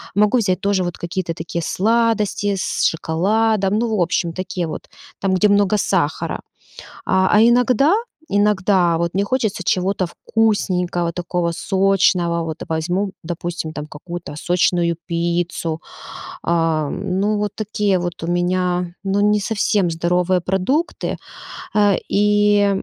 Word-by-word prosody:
могу 210 +4 +4
взять 190 -5 0
тоже 200 -2 +1
вот 175 -1 -4
какие-то 170 0 -3
такие 170 +1 -4
сладости, 210 -1 +1
с - - -1
шоколадом. 200 +5 +1
Ну, 225 -3 0
в - - +1
общем, 170 -1 0
такие 180 -2 -3
вот, - - -7 0.3
там, 195 -1 0
где 210 +3 +4
много 205 0 +3
сахара. 175 -6 -1 0.7
А 190 0 +3
а 210 - +5
иногда, 250 - +4 0.3
иногда 195 -4 +2
вот 170 0 -1
мне 200 +1 +1
хочется 220 -5 -1
чего-то 185 +1 0
вкусненького 180 -5 0
такого, 175 -1 -2
сочного: 185 -3 +2
вот 160 -1 -5
возьму, 175 +5 -1
допустим, 170 -1 -4
там 150 0 -6
какую-то 170 +1 -8
сочную 175 0 +1
пиццу. 170 -1 -2 0.6
А-а, 165 -3 +1
ну, 200 +2 -1
вот 205 -1 -1
такие 210 -2 0
вот 175 -1 -4
у - - -3
меня, 175 0 0
ну, 195 +1 0
не 210 0 +3
совсем 205 -3 +1
здоровые 180 +2 +1
продукты, 195 - -1 0.6
а, 205 -2 +4
и, 205 0 +3
185 Hz, 130 wpm, -20 LUFS, 170-205 Hz, 0.7 s, а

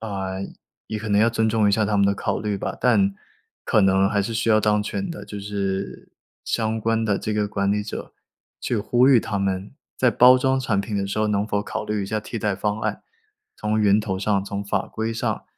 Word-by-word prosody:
啊， 95 -3 -4 0.5
也 110 - -4
可 110 0 -6
能 100 +1 +4
要 115 - +5
尊 110 -1 +1
重 110 -1 +2
一 100 - +2
下 110 +1 +2
他 105 0 0
们 100 - +4
的 100 - +2
考 - - -2
虑 105 -2 -2
吧， - - -4
但 100 -5 +3 0.5
可 105 - +3
能 95 0 +4
还 100 -1 +1
是 115 - -4
需 115 +1 -1
要 110 -1 +5
当 105 0 +2
权 190 - -4
的， 170 - -7
就 105 - -7
是 100 -1 -4 0.3
相 110 -1 -1
关 115 +1 0
的 100 -3 +1
这 110 - -3
个 105 -1 0
管 100 -1 0
理 105 0 0
者 105 - -7 0.5
去 120 - -1
呼 120 +5 +3
吁 130 - +7
他 105 -2 -3
们 95 +1 -2 0.3
在 125 -2 +4
包 125 +2 +7
装 130 +1 +1
产 110 -6 0
品 105 0 -4
的 100 - 0
时 100 +2 -3
候 110 - +2
能 105 0 +1
否 105 -1 0
考 - - -4
虑 105 -1 -2
一 - - -4
下 110 +2 -2
替 115 - -6
代 105 -1 0
方 105 +2 -2
案， - - -2 0.5
从 105 +1 -1
源 105 0 +4
头 105 -3 -2
上、 100 0 0
从 100 0 -4
法 100 - -1
规 110 +1 -3
上 115 - -2
105 Hz, 255 characters per minute, -23 LUFS, 100-110 Hz, 0.5 s, 吁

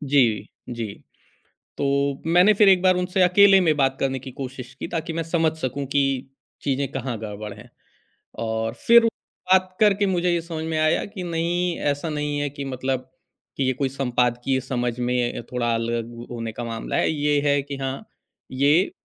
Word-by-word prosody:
जी, 135 -7 +2 0.2
जी। 115 -4 -4 0.9
तो - - 0 0.5
मैंने 180 +5 +6
फ़िर 205 0 +5
एक 185 -2 +5
बार 185 -1 +4
उनसे 180 +1 +1
अकेले 195 +2 +6
में 160 -4 +2
बात 135 -2 +2
करने 135 -1 0
की 130 +1 -9
कोशिश 130 -1 -7
की - - -6
ताकि 165 0 -3
मैं 165 +1 -2
समझ 165 -1 +1
सकूँ 140 0 -3
कि 140 - +4 0.6
चीज़ें 140 0 0
कहाँ 130 -3 -3
गड़बड़ 105 -1 -6
हैं 105 - -14 0.8
और 110 0 -2
फ़िर 235 0 +8 0.5
बात 185 0 +3
करके 205 -1 +4
मुझे 180 -1 +1
ये 170 - +1
समझ 165 -1 -6
में 160 -1 -2
आया 155 0 +2
कि 190 - -5
नहीं 175 +1 -1 0.2
ऐसा 145 +3 -5
नहीं 150 -1 -2
है 145 - 0
कि 140 0 -7
मतलब 130 -1 -3 0.5
कि 135 - 0
ये 130 - +2
कोई 135 +2 -1
संपादकीय 125 0 0
समझ 120 -2 -2
में 125 0 0
अ, - - -6
थोड़ा 120 -1 0
अलग 115 0 -2
वो 120 +1 -9
होने 115 -2 -5
का 120 - -6
मामला 115 -1 -4
है। - - +2
ये 145 -1 +1
है 140 0 +3
कि 140 0 -6
हाँ 135 0 -4 0.5
ये 145 +8 +3
140 Hz, 185 wpm, -23 LUFS, 125-170 Hz, 0.9 s, फ़िर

